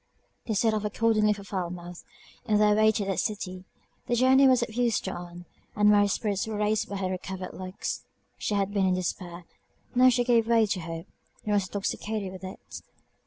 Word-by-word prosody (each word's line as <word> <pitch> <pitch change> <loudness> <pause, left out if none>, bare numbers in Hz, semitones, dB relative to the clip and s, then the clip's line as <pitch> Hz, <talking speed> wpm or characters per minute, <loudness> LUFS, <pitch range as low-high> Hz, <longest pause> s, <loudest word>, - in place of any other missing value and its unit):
They 220 - -1
set 220 +2 +2
off 215 -1 -1
accordingly 215 0 +2
for 200 -1 -3
Falmouth, 175 -3 -5 0.4
in 215 -3 +2
their 210 0 +4
way 215 +1 +5
to 210 -2 -2
that 195 -1 -1
city. 185 -3 -3 0.4
The 240 - +1
journey 260 +2 +5
was 255 -2 +4
of 220 - -6
use 240 -2 +1
to 190 - -4
Ann, 175 0 -9 0.3
and 210 0 +5
Mary's 205 -1 +4
spirits 205 -2 -1
were 220 -1 -3
raised 210 +1 0
by 200 - -4
her 190 -1 -2
recovered 185 0 -5
looks 185 0 -5 0.4
She 210 - -1
had 200 0 0
been 195 -2 +2
in 185 - +2
despair 180 -1 -4 0.5
now 255 +1 +6
she 245 0 +2
gave 235 -2 +3
way 230 -1 +4
to 200 -2 -2
hope, 165 -1 -6 0.4
and 210 - -1
was 200 -2 +1
intoxicated 205 0 -3
with 190 0 -10
it. 190 +2 -9
205 Hz, 200 wpm, -27 LUFS, 185-220 Hz, 0.5 s, now